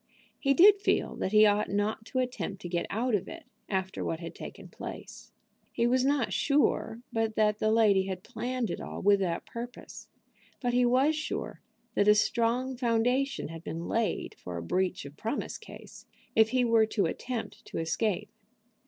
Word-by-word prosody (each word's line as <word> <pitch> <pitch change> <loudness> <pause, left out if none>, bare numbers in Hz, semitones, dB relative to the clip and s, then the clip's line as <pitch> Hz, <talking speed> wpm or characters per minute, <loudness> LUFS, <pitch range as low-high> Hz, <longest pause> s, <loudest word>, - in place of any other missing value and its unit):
He 275 -1 +2
did 400 +4 +7
feel - - +1
that 190 - -2
he 215 0 +7
ought 205 0 +2
not 210 +2 -1
to 260 - -5
attempt 250 -6 -2
to - - -4
get 175 0 -2
out 235 +3 -1
of 205 - 0
it 330 0 -9 0.3
after 190 -1 -2
what 160 - -2
had 165 -1 -7
taken - - -9
place. - - -9 0.4
He 235 - 0
was 250 +1 +3
not 275 -3 +1
sure 280 -5 +1
but 225 -1 0
that 210 -1 +2
the 215 - +2
lady 205 -4 +4
had 185 -1 -5
planned 250 -1 -3
it - - -4
all - - -6
with 200 0 +5
that 175 -3 -2
purpose; 240 +1 -8 0.5
but 245 -2 -1
he 245 0 +4
was 265 +6 +3
sure 305 - -4 0.3
that 205 - +2
a 210 - +7
strong 240 +4 +1
foundation 245 - 0
had 165 0 -8
been 165 +1 -5
laid 230 -1 -1
for 90 -1 -6
a 85 - -5
breach 185 - -1
of 140 +1 -11
promise 225 +6 -3
case - - -12 0.3
if 220 0 +5
he 255 0 +2
were 225 -2 +4
to 205 -3 0
attempt 240 +7 -4
to - - -7
escape. 180 +5 -1
225 Hz, 185 wpm, -29 LUFS, 195-250 Hz, 0.5 s, did